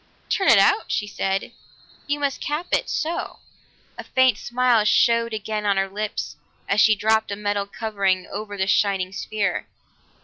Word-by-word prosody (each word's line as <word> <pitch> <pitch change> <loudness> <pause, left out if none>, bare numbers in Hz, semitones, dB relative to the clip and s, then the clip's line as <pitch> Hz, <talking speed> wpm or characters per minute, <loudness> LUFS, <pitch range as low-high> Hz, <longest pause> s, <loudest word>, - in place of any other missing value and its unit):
"Turn 385 - +1
it - - +7
out?" 420 - +4
she 210 - -1
said. 195 -1 -2 0.6
"You 290 0 -1
must 280 -2 -2
cap 300 +4 -2
it - - +1
so!" 325 +2 -3 0.6
A - - -5
faint 260 -4 +2
smile 240 -2 +2
showed 230 +1 +3
again 215 0 -3
on 200 -1 +1
her 195 0 +1
lips 210 +2 -5 0.3
as 200 +1 +3
she 215 - +5
dropped 220 +2 +1
a - - -2
metal 205 -1 -2
covering 200 -4 -1
over 205 -1 -7
the 190 - 0
shining 195 -2 +1
sphere. 205 +1 -2
215 Hz, 165 wpm, -23 LUFS, 200-240 Hz, 0.6 s, it